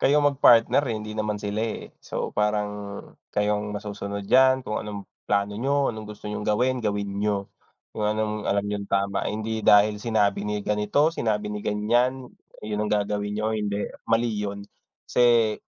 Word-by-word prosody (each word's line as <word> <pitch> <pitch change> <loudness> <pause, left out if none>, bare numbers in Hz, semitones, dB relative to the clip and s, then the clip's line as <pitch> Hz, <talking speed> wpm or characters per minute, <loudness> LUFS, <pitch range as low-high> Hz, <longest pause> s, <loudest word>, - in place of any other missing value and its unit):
kayo 145 +2 +4
ang 145 -1 +4
mag-partner, 120 0 +5
eh, - - -1
hindi 105 0 -6
naman 105 -1 -2
sila, 105 +1 -3
eh. 115 -1 -5
So, - - -4
parang 105 0 +1 0.6
kayo 105 0 +1
ang 105 - -5
masusunod 100 -1 -5
diyan 130 +1 +5
kung 105 - -2
anong 105 -2 -7 0.2
plano 100 0 +1
niyo, 140 +4 +1
anong 110 -1 -8
gusto 105 0 -10
niyong 105 0 -4
gawin, 125 +4 +1
gawin 100 -2 -2
niyo. 100 -1 0 0.5
Kung 105 - -2
anong 110 0 -1
alam 100 0 +1
niyong 100 -1 -4
tama, 100 0 0
hindi 110 +1 -3
dahil 105 0 +5
sinabi 105 -3 +1
ni 105 0 -2
ganito, 105 +10 +2
sinabi 105 -5 -1
ni 105 0 -4
ganiyan, 120 +5 +1 0.3
yun 105 0 -3
ang 105 - -2
gagawin 105 0 0
niyo, 110 +1 0
hindi. 105 -1 -2 0.2
Mali 115 0 +2
yun. 100 -1 -4 0.4
Kasi 120 -3 +4
105 Hz, 170 wpm, -25 LUFS, 105-110 Hz, 0.6 s, mag-partner